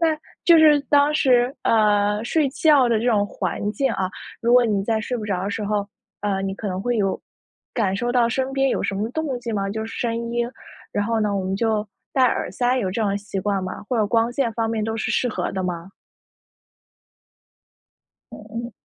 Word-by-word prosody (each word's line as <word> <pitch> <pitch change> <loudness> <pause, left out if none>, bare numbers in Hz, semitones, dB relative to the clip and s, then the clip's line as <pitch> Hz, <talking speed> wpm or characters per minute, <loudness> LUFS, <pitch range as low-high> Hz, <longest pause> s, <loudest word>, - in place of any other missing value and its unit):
那 330 - +4 0.4
就 340 -2 +7
是 305 -2 +6
当 290 +1 +5
时 255 -3 +3
呃， 210 -1 +2
睡 295 +3 +1
觉 285 -2 +4
的 230 -2 +2
这 230 - -2
种 215 -4 +3
环 205 +1 -3
境， 270 +6 0
啊， 185 -1 -2 0.3
如 235 0 +2
果 250 0 +6
你 205 -4 +1
在 220 0 0
睡 245 +3 -3
不 220 - -5
着 190 -3 -2
的 200 - -2
时 210 +1 -3
候， 205 -1 -1 0.3
呃， 195 -2 -1
你 195 0 -2
可 210 - -6
能 185 0 -3
会 245 +1 0
有 195 -3 0 0.5
感 200 -5 +1
受 240 +4 -1
到 240 -2 +3
身 265 +3 -1
边 270 0 +2
有 - - -1
什 205 - -1
么 210 +3 -1
动 290 -2 -2
静 235 -2 -4
吗？ 195 -1 -1
就 220 +2 -3
是 225 - -8
声 235 0 -2
音， 240 0 0 0.4
然 205 - 0
后 225 +1 0
呢， 210 -1 0
我 190 - -2
们 190 +1 -1
就 220 0 0 0.3
戴 260 - +4
耳 250 - 0
塞， 245 +1 +1
有 195 -7 -1
这 200 - -3
种 200 -1 +1
习 200 -1 -6
惯 195 0 -1
吗？ 185 - -6
或 250 - 0
者 220 - +3
光 230 +3 +1
线 245 -3 0
方 225 0 -1
面 225 -1 -1
都 225 0 -2
是 220 - -2
适 250 - +1
合 225 - -2
的 190 -1 -2
吗？ 175 0 -4 2.4
嗯 210 - -10 0.2
嗯。 240 - -9
225 Hz, 235 characters per minute, -22 LUFS, 205-245 Hz, 2.4 s, 就